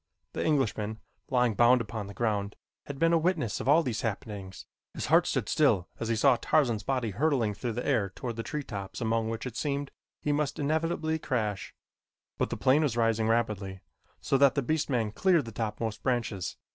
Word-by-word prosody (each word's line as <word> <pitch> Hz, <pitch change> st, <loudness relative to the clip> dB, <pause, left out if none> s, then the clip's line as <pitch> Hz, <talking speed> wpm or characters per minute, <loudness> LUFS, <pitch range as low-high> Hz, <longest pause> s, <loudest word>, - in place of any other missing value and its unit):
The -, -, -2 dB
Englishman, 110 Hz, -7 st, 0 dB, 0.3 s
lying 125 Hz, -3 st, +2 dB
bound 120 Hz, +4 st, +5 dB
upon 110 Hz, -2 st, -5 dB
the 100 Hz, -, -10 dB
ground, 105 Hz, -3 st, -1 dB, 0.3 s
had 140 Hz, -, -6 dB
been 165 Hz, +3 st, +3 dB
a 165 Hz, -, +5 dB
witness 160 Hz, -, 0 dB
of -, -, -2 dB
all 160 Hz, +3 st, +6 dB
these 120 Hz, -6 st, -2 dB
happenings. 100 Hz, -3 st, -5 dB, 0.3 s
His -, -, -3 dB
heart -, -, +6 dB
stood -, -, -1 dB
still 90 Hz, -1 st, +2 dB
as 115 Hz, -, -3 dB
he 115 Hz, -, +1 dB
saw 125 Hz, +2 st, +4 dB
Tarzan's 120 Hz, -8 st, +2 dB
body 125 Hz, -1 st, -1 dB
hurtling 120 Hz, -2 st, +1 dB
through 115 Hz, +3 st, -4 dB
the 120 Hz, -, -4 dB
air 115 Hz, -9 st, +1 dB
toward 115 Hz, +5 st, -6 dB
the 115 Hz, -, -3 dB
tree 150 Hz, +5 st, -4 dB
tops 100 Hz, -6 st, -6 dB
among 115 Hz, -1 st, 0 dB
which 115 Hz, +2 st, -4 dB
it 125 Hz, -3 st, -6 dB
seemed 140 Hz, +1 st, -2 dB, 0.3 s
he 150 Hz, -, -1 dB
must 145 Hz, -1 st, 0 dB
inevitably 160 Hz, +2 st, 0 dB
crash; 110 Hz, -9 st, -2 dB, 0.6 s
but -, -, +1 dB
the -, -, -3 dB
plane 135 Hz, +4 st, +4 dB
was 135 Hz, -7 st, 0 dB
rising 115 Hz, -1 st, +2 dB
rapidly, 105 Hz, -5 st, -1 dB, 0.4 s
so 135 Hz, -, +1 dB
that 140 Hz, -1 st, +5 dB
the 140 Hz, -, +1 dB
beast 155 Hz, +4 st, 0 dB
man 115 Hz, -5 st, 0 dB
cleared 170 Hz, -, +2 dB
the 115 Hz, -, -7 dB
top 110 Hz, -1 st, -3 dB
most 110 Hz, -2 st, -3 dB
branches. 115 Hz, -7 st, -2 dB
120 Hz, 200 wpm, -29 LUFS, 110-140 Hz, 0.6 s, all